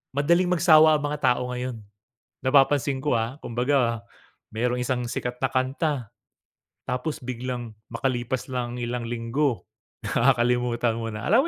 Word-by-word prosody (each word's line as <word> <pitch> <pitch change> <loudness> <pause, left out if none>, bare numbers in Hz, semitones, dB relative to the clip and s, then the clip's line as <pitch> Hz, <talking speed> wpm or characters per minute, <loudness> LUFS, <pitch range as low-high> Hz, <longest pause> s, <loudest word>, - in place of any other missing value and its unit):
madaling 170 +5 +3
magsawa 155 -2 +6
ang 150 - -6
mga 150 0 -2
tao 125 0 -4
ngayon. 125 -1 -4 0.7
Napapansin 135 0 +3
ko, 145 -4 +2
ah, 115 +4 -3
kumbaga, 120 -1 0 0.5
mayroong 125 +2 0
isang 125 0 -1
sikat 125 0 -3
na 130 - +3
kanta 130 -1 -1 0.8
tapos 125 +5 -2
biglang 120 -2 -5 0.2
makalipas 125 0 -2
lang 125 -1 -3
ang - - -6
ilang 120 0 -3
linggo, 120 -1 -1 0.4
nakakalimutan 120 -1 +2
mo 115 - -3
na. 110 - -6
Alam 235 - +4
125 Hz, 135 wpm, -25 LUFS, 120-140 Hz, 0.8 s, magsawa